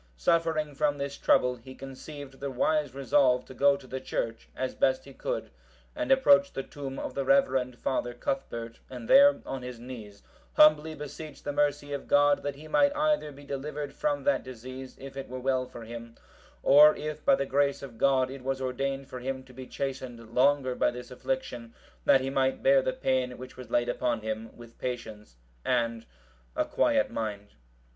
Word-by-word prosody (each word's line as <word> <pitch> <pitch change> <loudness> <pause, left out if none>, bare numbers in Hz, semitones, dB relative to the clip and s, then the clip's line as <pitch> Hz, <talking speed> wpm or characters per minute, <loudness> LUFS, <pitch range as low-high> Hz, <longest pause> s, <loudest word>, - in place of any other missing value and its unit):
Suffering 160 - +1
from 145 0 +1
this 140 0 -4
trouble, 125 -2 +3
he 130 +3 -12
conceived 135 0 -9
the 140 - -3
wise 145 +1 0
resolve 130 -1 +3
to - - -11
go 140 +2 +4
to 140 - -15
the 130 +1 -5
church, 115 -3 -4
as 130 0 -2
best 130 0 +1
he 140 - -12
could, - - -4 0.4
and 300 -2 -2
approach 280 +1 +5
the 135 - -3
tomb 135 -1 -7
of - - -4
the 140 - -1
reverend 130 -7 +2
father 120 -2 -2
Cuthbert, 115 -3 -4
and 125 -3 -8
there, 285 +1 +7
on 135 -1 -4
his 125 -1 -7
knees, 110 -5 -10 0.3
humbly 155 +1 +5
beseech 150 0 -8
the 145 - -3
mercy 145 0 0
of 140 - -5
God 145 0 +4
that 145 -1 -3
he 150 +3 -11
might 285 - +3
either 300 - +1
be 140 +1 -13
delivered 145 +1 -5
from 290 -1 -1
that 285 - +2
disease, 130 +1 -9
if 135 0 -10
it 135 0 -6
were 130 +1 -5
well 130 0 0
for 120 -2 -10
him, 115 0 -9 0.5
or 150 +2 +8
if 155 0 -5
by - - +5
the 140 - -1
grace 140 +1 +1
of 115 -5 -10
God 130 -1 +3
it 135 -1 -8
was 135 0 -1
ordained 135 +1 -2
for 125 - -7
him 130 +1 -4
to 130 -1 -17
be 130 0 -9
chastened 125 -4 -5
longer 135 0 +3
by 125 - +2
this 125 +1 -8
affliction, 125 -2 -4 0.3
that 135 - +6
he 135 +1 -2
might 135 -1 +1
bear 135 0 +6
the 130 - 0
pain 130 -1 -1
which 130 +1 -10
was 125 -3 -10
laid 120 0 +1
upon 120 -2 -1
him 110 +1 -4
with 120 -1 -14
patience 110 - -6 0.3
and 115 -2 0 0.5
a - - +1
quiet - - +2
mind. 105 -2 -4
135 Hz, 190 wpm, -29 LUFS, 125-145 Hz, 0.5 s, or